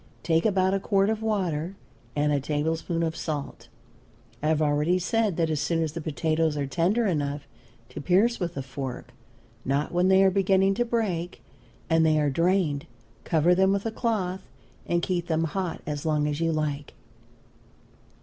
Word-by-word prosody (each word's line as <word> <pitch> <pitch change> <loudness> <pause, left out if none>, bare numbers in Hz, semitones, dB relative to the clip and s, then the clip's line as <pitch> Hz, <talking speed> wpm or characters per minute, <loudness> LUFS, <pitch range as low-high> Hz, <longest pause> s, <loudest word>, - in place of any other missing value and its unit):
Take 165 +4 +2
about 190 -2 +2
a 195 - +1
quart 195 +1 +2
of 220 0 -3
water 185 -5 -1 0.4
and 150 0 +1
a 145 - +2
tablespoonful 160 +4 -1
of 160 - -5
salt. 150 -4 -5 0.7
I 150 - -1
have 155 -1 +2
already 150 +3 +2
said 210 0 0
that 165 -2 +1
as 150 -2 -1
soon 165 +1 0
as 155 - -2
the 165 +2 -6
potatoes 155 0 0
are 140 - -1
tender 175 - +1
enough 145 -5 -2 0.4
to - - -7
pierce 200 +9 +2
with 175 -3 -3
a 135 - -2
fork, 130 -1 -6 0.5
not 140 +3 -1
when 175 +1 +2
they 190 0 +5
are 190 - +5
beginning 195 0 +3
to 240 +4 0
break, 200 -8 -2 0.4
and 165 -1 +3
they 155 -1 +3
are 145 -1 +1
drained, 165 -2 +1 0.4
cover 165 +2 +3
them 190 +1 +3
with 200 +1 -1
a 225 - -1
cloth 205 -6 -1 0.5
and 175 0 0
keep 175 -2 -1
them 160 -1 +1
hot 175 +2 -3
as 145 -1 -4
long 150 -2 +1
as 150 +1 -2
you 165 0 +2
like. 150 -2 -3
165 Hz, 180 wpm, -26 LUFS, 150-190 Hz, 0.7 s, they